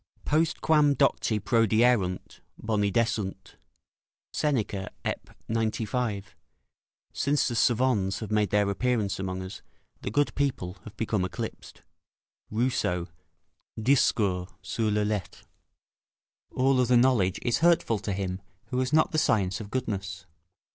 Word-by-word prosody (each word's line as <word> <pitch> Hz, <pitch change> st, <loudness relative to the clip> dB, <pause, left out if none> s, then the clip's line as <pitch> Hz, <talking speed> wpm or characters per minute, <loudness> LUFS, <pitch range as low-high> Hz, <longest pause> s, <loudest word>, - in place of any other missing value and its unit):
"Postquam 155 Hz, -1 st, +3 dB
docti 125 Hz, -6 st, +2 dB
prodierunt, 110 Hz, -3 st, +2 dB, 0.2 s
boni 105 Hz, -2 st, 0 dB
desunt." 105 Hz, -4 st, -2 dB, 0.8 s
[Seneca, 110 Hz, -9 st, -1 dB, 0.2 s
Ep., -, -, -3 dB, 0.2 s
95. 110 Hz, -1 st, -2 dB, 0.8 s
"Since 140 Hz, +1 st, +1 dB
the -, -, -3 dB
'savans' 115 Hz, -5 st, +2 dB
have 110 Hz, -2 st, -6 dB
made 105 Hz, -1 st, +2 dB
their 105 Hz, 0 st, +2 dB
appearance 110 Hz, -3 st, 0 dB
among 95 Hz, -1 st, -3 dB
us, 95 Hz, -, -8 dB, 0.4 s
the -, -, -3 dB
good 145 Hz, +7 st, +1 dB
people 125 Hz, -10 st, -2 dB
have 105 Hz, -1 st, -11 dB
become 110 Hz, -4 st, 0 dB
eclipsed." 90 Hz, -, -6 dB, 0.7 s
Rousseau, 105 Hz, -7 st, 0 dB, 0.7 s
Discours 105 Hz, -7 st, +2 dB
sur 110 Hz, -2 st, -1 dB
les 105 Hz, 0 st, +1 dB
Lettres.] 105 Hz, -4 st, -3 dB, 1.1 s
All 130 Hz, 0 st, +2 dB
other 125 Hz, 0 st, +4 dB
knowledge 120 Hz, -7 st, +3 dB
is 120 Hz, -, +1 dB
hurtful 165 Hz, -10 st, +3 dB
to 105 Hz, -, -4 dB
him 95 Hz, -1 st, -3 dB, 0.3 s
who 125 Hz, -, -1 dB
has 130 Hz, +1 st, 0 dB
not 155 Hz, +1 st, +3 dB
the 155 Hz, -, +2 dB
science 95 Hz, -7 st, +1 dB
of 100 Hz, -, -8 dB
goodness. 100 Hz, -8 st, -4 dB
110 Hz, 120 wpm, -27 LUFS, 100-125 Hz, 1.1 s, other